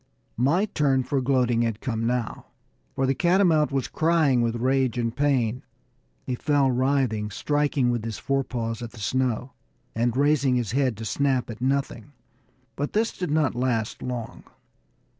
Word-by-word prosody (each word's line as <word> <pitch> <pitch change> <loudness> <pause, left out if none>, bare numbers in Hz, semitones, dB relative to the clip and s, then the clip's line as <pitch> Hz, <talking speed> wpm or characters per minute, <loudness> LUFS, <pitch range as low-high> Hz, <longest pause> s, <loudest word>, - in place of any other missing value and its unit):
My 145 - +2
turn 140 -9 +1
for 140 +1 -1
gloating 125 -3 +2
had 115 -2 -1
come 115 -3 -2
now, 120 -2 -2 0.5
for 135 - +1
the 135 - +2
catamount 170 -1 +3
was 135 -2 -1
crying 155 -6 +2
with 115 0 0
rage 130 0 +1
and 115 -1 -1
pain. 130 -5 +1 0.6
He 130 - -2
fell 140 +1 +2
writhing, 125 -5 0
striking 145 +2 0
with 120 -2 -2
his 110 -4 -4
forepaws 120 -4 -2
at 120 -1 -7
the 120 - -12
snow, 125 +3 -1 0.4
and 120 +2 0
raising 140 -2 +3
his 120 -5 -1
head 130 -3 +1
to 110 - -6
snap 130 0 0
at 115 - -10
nothing; 135 -1 -2 0.6
but 145 +1 -3
this 225 +2 0
did 180 -3 -3
not 150 -3 +1
last 120 -3 -1
long. 125 -3 -6
130 Hz, 160 wpm, -25 LUFS, 120-140 Hz, 0.6 s, catamount